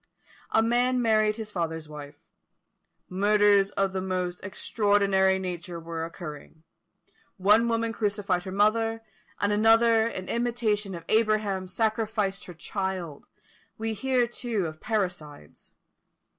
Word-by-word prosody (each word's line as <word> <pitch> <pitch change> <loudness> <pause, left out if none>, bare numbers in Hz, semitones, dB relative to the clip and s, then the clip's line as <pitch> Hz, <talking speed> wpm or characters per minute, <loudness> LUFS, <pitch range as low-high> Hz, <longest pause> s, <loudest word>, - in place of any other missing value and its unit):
A 225 - +3
man 245 +2 +2
married 215 -2 +3
his 220 -1 -6
father's 160 -4 -3
wife. 150 -1 -9 0.9
Murders 205 +1 +3
of 195 -1 -1
the 190 - -2
most 180 -1 -2
extraordinary 200 -1 +2
nature 175 -2 -5
were 165 0 -5
occurring; 160 -2 -9 0.7
one 210 +5 +4
woman 230 0 0
crucified 205 -4 -1
her 190 - -5
mother; 225 +3 +1 0.4
another, 225 +2 +4
in 185 -5 -6
imitation 225 -5 -1
of 170 - -9
Abraham, 215 -4 +1
sacrificed 215 -1 -1
her 180 - -10
child; 185 -4 -4 0.5
we 225 0 -2
hear, 250 +3 +1
too, 235 -4 -3
of 155 -1 -7
parricides. 180 - -4
205 Hz, 115 wpm, -27 LUFS, 180-225 Hz, 0.9 s, one